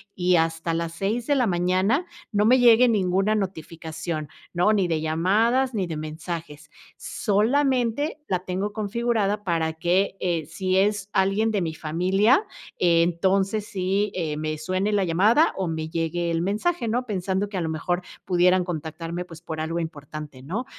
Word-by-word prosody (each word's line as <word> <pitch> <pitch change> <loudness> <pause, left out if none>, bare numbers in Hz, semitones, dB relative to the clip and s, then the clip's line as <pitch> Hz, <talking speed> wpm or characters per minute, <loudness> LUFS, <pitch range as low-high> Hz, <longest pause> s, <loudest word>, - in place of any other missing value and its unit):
y 180 0 +2
hasta 165 0 0
las 165 0 -2
6, 210 +7 -2
de 285 - +3
la 250 -4 +2
mañana, 185 - +1 0.3
no 205 0 +3
me 255 +3 +5
llegue 245 0 +6
ninguna 195 0 +2
notificación, 160 -4 -4 0.3
¿no? 180 +5 +3
Ni 195 -4 +2
de 160 -1 +1
llamadas 210 +12 +2
ni 195 -5 -1
de 165 - -4
mensajes. 155 0 -6 0.3
Solamente 255 +6 0
la 185 - 0
tengo 190 +3 -3
configurada 215 -1 -1
para 165 -3 0
que, 180 +4 0
eh, 170 -4 -1
si 185 +4 -2
es 200 0 +1
alguien 195 +4 +2
de 205 -3 0
mi 165 -2 -2
familia, 185 - +2 0.4
entonces 185 +4 +2
sí, 195 +1 -1
eh, 160 -4 -2
me 155 0 -3
suene 185 +6 -1
la 200 -2 +2
llamada, 210 - +4
o 190 -2 -2
me 160 -1 -3
llegue 170 +1 -1
el 165 0 0
mensaje, 230 - -1
¿no? 245 +3 0
Pensando 195 -2 -1
que 200 - -9
a - - -1
lo 160 - -2
mejor 175 +3 -1 0.2
pudieran 180 0 +3
contactarme, 165 0 -5
pues, 165 -2 -12
por 160 -2 -6
algo 165 +2 -2
importante, 150 -3 -7
¿no? 190 - -4
185 Hz, 165 wpm, -24 LUFS, 165-210 Hz, 0.4 s, llegue